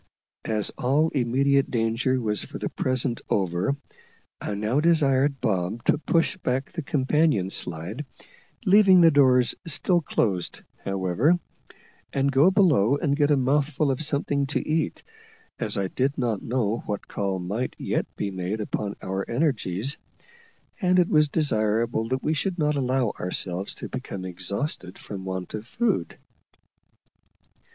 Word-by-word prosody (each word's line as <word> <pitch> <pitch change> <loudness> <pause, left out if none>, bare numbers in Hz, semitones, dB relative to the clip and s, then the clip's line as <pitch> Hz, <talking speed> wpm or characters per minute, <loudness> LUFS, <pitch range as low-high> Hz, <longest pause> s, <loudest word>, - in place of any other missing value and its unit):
As 110 -2 +1
all 145 +6 +2
immediate 135 +1 +2
danger 115 +3 0
was 105 -4 0
for - - -7
the - - -3
present 130 -2 -1
over, 95 +7 0 0.7
I 105 - -3
now 110 +7 0
desired 140 -4 +3
Bob 95 +2 -1
to - - +2
push 165 +4 +1
back 135 -5 -2
the 170 - -4
companion 140 - +1
slide, 90 - -3 0.6
leaving 190 -2 +6
the 165 -1 +7
doors 130 -4 +4
still 170 +3 +2
closed 95 - -1 0.2
however, 95 - +1 0.7
and 140 0 +1
go 140 +6 +5
below 150 - +3
and 145 -2 0
get 145 0 +2
a 145 - +4
mouthful 140 +2 +1
of 130 - -2
something 140 -2 0
to 140 - -2
eat, 160 0 -1 0.6
as - - -1
I 100 -1 0
did 135 +8 -1
not 120 -6 -1
know 115 -2 -1
what 105 -1 -4
call 100 -2 -2
might 100 +8 -3
yet - - -1
be 100 - -3
made 95 +3 -3
upon 105 -1 -3
our 95 +1 -2
energies; 125 - 0 0.8
and 180 -1 +3
it 180 -2 +4
was 150 -2 +4
desirable 115 -5 0
that 130 +1 -1
we 155 - +1
should 180 +4 -2
not 150 -2 +1
allow 130 -4 +1
ourselves 90 +1 -2
to - - -6
become 95 -2 -6
exhausted 95 - -3
from 95 -2 -8
want 95 -1 -5
of 110 +1 -6
food. 235 - -1
130 Hz, 145 wpm, -25 LUFS, 105-150 Hz, 0.8 s, the